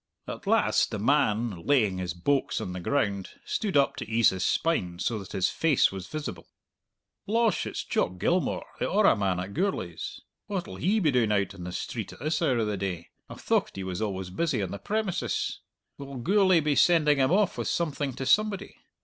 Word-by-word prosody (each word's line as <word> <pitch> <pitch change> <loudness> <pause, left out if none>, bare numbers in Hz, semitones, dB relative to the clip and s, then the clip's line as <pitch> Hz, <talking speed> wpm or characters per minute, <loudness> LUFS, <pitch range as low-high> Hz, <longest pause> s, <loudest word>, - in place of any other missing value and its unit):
At - - -7
last - - +3
the - - -4
man, 110 - +1
laying 110 -10 +3
his 90 -2 -3
"boax" 135 +11 0
on 90 - -5
the 90 - -5
ground, 100 -3 -1 0.2
stood 200 -9 -1
up 140 - +3
to - - -6
ease 115 0 +4
his 95 -1 -3
spine, 90 - 0
so 110 +4 -1
that 95 - -10
his 95 - +1
face 160 -5 +3
was 95 -1 -7
visible. 155 -1 -6 0.8
"Losh, 225 +1 +1
it's - - -4
Jock 90 +1 -1
Gilmour, 175 - 0 0.2
the - - 0
orra 205 - +4
man 95 -4 0
at 95 +2 -5
Gourlay's! 155 - -3 0.3
What'll 190 -4 -4
he 210 +5 +2
be 160 -7 +2
doing 120 -4 +2
out 100 -2 +1
on 90 -3 -9
the 90 - -5
street - - -5
at - - -14
this 155 +5 -1
hour 135 -7 +2
of 115 - +1
the 105 -1 -2
day? 90 -3 -4 0.2
I - - -8
thocht - - 0
he 95 - -4
was 95 +2 -4
always 95 -4 -3
busy 140 - 0
on 95 - -4
the 100 - -5
premises! 210 - -2 0.4
Will 140 -1 -8
Gourlay 185 - +4
be 150 -1 +1
sending 150 0 +4
him 130 +2 +3
off 200 0 +3
with - - -2
something 145 -5 -1
to 130 +2 -5
somebody? 205 +8 +1
125 Hz, 200 wpm, -27 LUFS, -, 0.8 s, ease